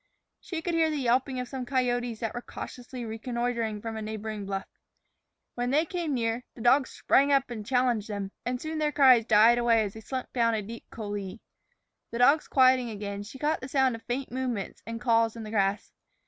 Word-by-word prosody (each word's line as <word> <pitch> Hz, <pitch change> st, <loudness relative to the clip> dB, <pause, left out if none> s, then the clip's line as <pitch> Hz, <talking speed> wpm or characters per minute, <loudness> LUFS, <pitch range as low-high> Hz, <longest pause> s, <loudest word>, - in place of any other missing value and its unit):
She 325 Hz, -3 st, -6 dB
could 345 Hz, -, -1 dB
hear 325 Hz, -1 st, +3 dB
the 305 Hz, -, -2 dB
yelping 255 Hz, 0 st, +1 dB
of 250 Hz, -, -4 dB
some 260 Hz, 0 st, -5 dB
coyotes 245 Hz, -3 st, -1 dB
that 225 Hz, -, -2 dB
were 240 Hz, -, -4 dB
cautiously 245 Hz, 0 st, -8 dB
reconnoitering 230 Hz, -1 st, -2 dB
from 225 Hz, -1 st, -4 dB
a 220 Hz, -, -4 dB
neighboring 215 Hz, -1 st, -5 dB
bluff. 195 Hz, -1 st, -3 dB, 0.9 s
When 245 Hz, 0 st, -2 dB
they 300 Hz, +5 st, +3 dB
came 335 Hz, -4 st, -2 dB
near, 230 Hz, 0 st, -1 dB
the 235 Hz, -, -10 dB
dogs 255 Hz, +3 st, +4 dB
sprang 280 Hz, +1 st, +3 dB
up 275 Hz, -2 st, +2 dB
and 220 Hz, -3 st, -5 dB
challenged 245 Hz, -2 st, +1 dB
them, 200 Hz, -2 st, -4 dB
and 250 Hz, +1 st, -2 dB
soon 315 Hz, +2 st, -4 dB
their 300 Hz, -1 st, +1 dB
cries 255 Hz, -5 st, +6 dB
died 225 Hz, +2 st, +6 dB
away 230 Hz, -2 st, +4 dB
as 200 Hz, -2 st, -4 dB
they 220 Hz, -, -10 dB
slunk 255 Hz, +3 st, -5 dB
down 230 Hz, -2 st, +2 dB
a 215 Hz, -, -2 dB
deep 230 Hz, +3 st, -9 dB
coulée. 205 Hz, -2 st, -5 dB, 0.7 s
The 235 Hz, -, -5 dB
dogs 280 Hz, +6 st, +4 dB
quieting 255 Hz, -2 st, +4 dB
again, 200 Hz, -2 st, -5 dB
she 210 Hz, +6 st, -9 dB
caught 300 Hz, +2 st, 0 dB
the 260 Hz, -, -7 dB
sound 265 Hz, -2 st, +3 dB
of 225 Hz, -, -7 dB
faint 255 Hz, +3 st, -4 dB
movements 250 Hz, -5 st, -3 dB
and 230 Hz, 0 st, -4 dB
calls 230 Hz, -2 st, +2 dB
in 230 Hz, -, -7 dB
the 215 Hz, -, -7 dB
grass. 200 Hz, -1 st, 0 dB
240 Hz, 205 wpm, -28 LUFS, 220-260 Hz, 0.9 s, cries